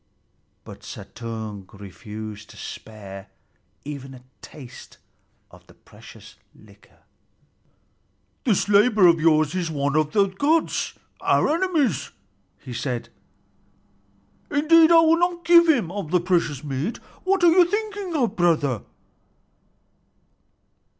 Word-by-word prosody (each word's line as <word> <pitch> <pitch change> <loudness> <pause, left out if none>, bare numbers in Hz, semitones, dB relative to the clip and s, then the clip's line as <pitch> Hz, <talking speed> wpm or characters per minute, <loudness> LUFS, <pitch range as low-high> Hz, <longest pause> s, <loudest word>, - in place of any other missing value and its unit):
But - - -12
Suttung 110 -4 -8
refused 105 +2 -9
to - - -15
spare 100 -3 -10 0.6
even 135 -2 -8
a 125 - -15 0.2
taste 135 -4 -13 0.5
of - - -18
the - - -19
precious - - -16 0.2
liquor. - - -22 1.4
"This 220 -8 +1
laborer 210 0 +4
of 165 -1 +3
yours 155 -2 +3
is 180 -3 -2
one 145 -2 -2
of 155 -1 +1
the 200 -2 +4
gods, 285 +12 0 0.3
our - - +2
enemies," 320 - 0 0.5
he 125 - -10
said. 120 0 -4 1.4
"Indeed, 320 +3 +5
I 330 -1 +7
will 330 +1 +3
not 350 -1 -1
give 340 0 +6
him 235 - +2
of 200 -5 -5
the 180 +2 +2
precious 170 -6 -1
mead. 145 - -3 0.3
What 380 0 +1
are 340 - +7
you 360 +1 +6
thinking 410 -2 -4
of, 250 -6 0
brother!" 155 - +1
175 Hz, 115 wpm, -23 LUFS, -, 1.4 s, I